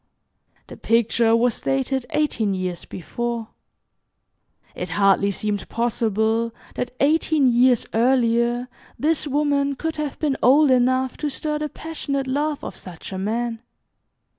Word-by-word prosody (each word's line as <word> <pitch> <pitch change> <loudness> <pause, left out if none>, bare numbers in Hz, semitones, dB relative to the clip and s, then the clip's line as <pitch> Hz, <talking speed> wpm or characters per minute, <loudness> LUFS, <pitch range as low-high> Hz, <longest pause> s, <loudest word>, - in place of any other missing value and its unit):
The - - -11
picture 230 0 +2
was 235 0 +1
dated 265 -1 -1
eighteen 230 -10 0
years 185 -2 -4
before. 235 +4 -4 1.2
It 180 - -5
hardly 195 0 +4
seemed 205 0 -3
possible 225 0 0 0.2
that 250 - -3
eighteen 305 0 +3
years 245 0 +4
earlier 240 0 +2 0.3
this 310 +1 0
woman 285 -1 +1
could 320 +3 -4
have 300 -2 -3
been 290 -3 0
old 280 +3 +5
enough 255 +1 +2
to 300 - -2
stir 300 +2 -3
the 300 0 -3
passionate 285 -4 -4
love 290 +3 -1
of - - -6
such 180 +1 -9
a 190 - -4
man. 230 +3 -2
245 Hz, 130 wpm, -22 LUFS, 225-280 Hz, 1.2 s, old